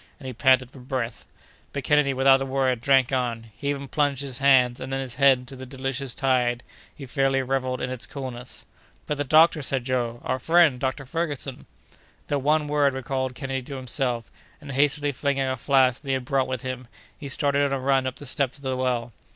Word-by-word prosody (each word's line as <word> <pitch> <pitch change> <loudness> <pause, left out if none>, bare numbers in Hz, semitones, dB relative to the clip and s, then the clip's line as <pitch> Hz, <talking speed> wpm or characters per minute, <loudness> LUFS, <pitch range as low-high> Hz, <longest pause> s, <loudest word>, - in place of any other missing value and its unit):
and 140 - -12
he 130 - -5
panted 130 +1 +3
for 135 - -13
breath. 125 -3 -4 0.5
But 140 - -3
Kennedy, 145 0 +3
without 135 0 +4
a - - -1
word, 130 -2 +1
drank 135 0 +3
on. 120 -4 -2
He 140 - -3
even 140 -1 -3
plunged 145 -1 0
his 135 -2 -5
hands, 130 -3 +4
and 130 +1 -6
then 135 - -1
his 130 -2 -5
head, 135 0 +5
into 125 +1 -8
the 130 0 -9
delicious 135 -1 -4
tide—he 125 +1 -2
fairly 135 0 +1
revelled 130 -1 -1
in 125 - -2
its 130 -2 -4
coolness. 125 -3 -6 0.4
"But 150 -1 -3
the - - +1
doctor?" 155 +2 +5
said 135 -2 -1
Joe; 120 -2 -1
"our 130 - -1
friend, 165 -5 +4
Dr. 135 +1 -2
Ferguson?" 145 -3 -4 0.6
That 145 - +1
one 150 +3 +2
word 145 -2 +2
recalled 130 0 -3
Kennedy 135 -2 -3
to 135 +2 -8
himself, 125 -2 -2 0.3
and, 145 -2 -9
hastily 145 +2 +1
filling 140 +1 -1
a 130 -1 0
flask 130 0 +2
that 145 - -14
he 135 - +1
had 130 -1 -4
brought 135 0 +1
with 130 0 -4
him, 130 -1 -5 0.3
he 145 - -8
started 140 0 +2
on 140 - +1
a 135 - 0
run 135 0 +2
up 130 - -4
the 145 - -10
steps 135 0 0
of 140 - -14
the 130 -1 -1
well. 125 -2 -1
135 Hz, 210 wpm, -25 LUFS, 130-140 Hz, 0.6 s, head